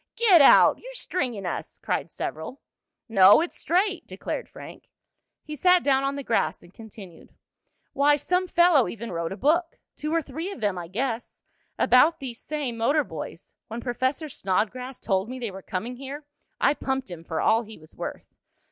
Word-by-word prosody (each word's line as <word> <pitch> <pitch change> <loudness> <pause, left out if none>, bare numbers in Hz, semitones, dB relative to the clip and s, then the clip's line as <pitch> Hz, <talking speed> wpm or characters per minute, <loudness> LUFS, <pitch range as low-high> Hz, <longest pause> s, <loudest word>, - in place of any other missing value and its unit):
"Get 395 -9 +6
out! 275 - +7
You're - - -11
stringing 250 - -3
us!" 175 - -5
cried - - -2
several. 160 - -6 0.5
"No, 200 -3 +7
it's 340 +2 -3
straight!" 380 +3 0
declared - - -5
Frank. - - -12 0.5
He 305 - -7
sat 360 +4 +4
down 270 -1 +2
on 275 0 -1
the 280 - -5
grass 230 - 0
and 175 - -18
continued: 200 -6 -13 0.6
"Why, 290 +1 +4
some 360 +5 0
fellow 345 -7 +4
even 230 +1 -6
wrote 170 -1 -3
a 195 - -5
book 330 +6 +1 0.2
two 305 +1 -4
or 330 -1 +1
three 320 +8 -5
of 395 - -8
them 205 -4 0
I 175 -2 -6
guess 230 +5 -4 0.3
about 300 +6 +4
these 245 -4 -7
same 285 -6 -4
motor 285 +7 +2
boys. - - -9
When 225 +2 -6
Professor 260 +5 -2
Snodgrass 250 +3 -2
told 195 +1 -1
me 255 - -6
they 235 -5 -4
were 190 +1 -9
coming 225 +7 -5
here 275 +3 -8 0.3
I 280 - +4
pumped 265 -7 -3
him 165 -2 -8
for 160 -1 -4
all 225 +1 +3
he 220 -1 -11
was 155 0 -18
worth. - - -7
255 Hz, 180 wpm, -25 LUFS, 210-305 Hz, 0.6 s, out